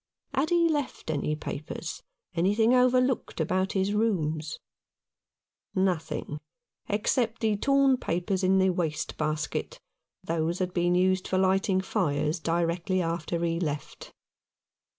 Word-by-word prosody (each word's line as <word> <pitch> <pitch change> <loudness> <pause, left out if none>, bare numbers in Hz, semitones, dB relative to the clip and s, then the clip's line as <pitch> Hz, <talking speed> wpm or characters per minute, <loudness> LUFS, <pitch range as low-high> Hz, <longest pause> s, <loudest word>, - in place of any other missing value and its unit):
Had 280 +4 +1
he 345 -1 +4
left 290 - -2
any 150 0 -1
papers 150 0 -6 0.2
— - - -57
anything 205 +7 +3
overlooked 255 -2 +2
about 185 +4 0
his 195 +1 +1
rooms? 160 -8 0 1.2
Nothing 160 -5 -1 0.5
except 225 +2 0
the 220 -2 +2
torn 275 +3 +3
papers 185 0 -1
in 190 +1 +4
the 190 0 +4
waste 165 -4 -2
basket; 155 0 -2 0.4
those 165 +1 -1
had 185 -1 -2
been 175 0 +2
used 185 +1 +2
for 185 - 0
lighting 190 +1 +2
fires 160 -5 0
directly 170 +3 0
after 170 0 -2
he 165 0 0
left. 150 -4 -4
185 Hz, 125 wpm, -28 LUFS, 165-210 Hz, 1.2 s, he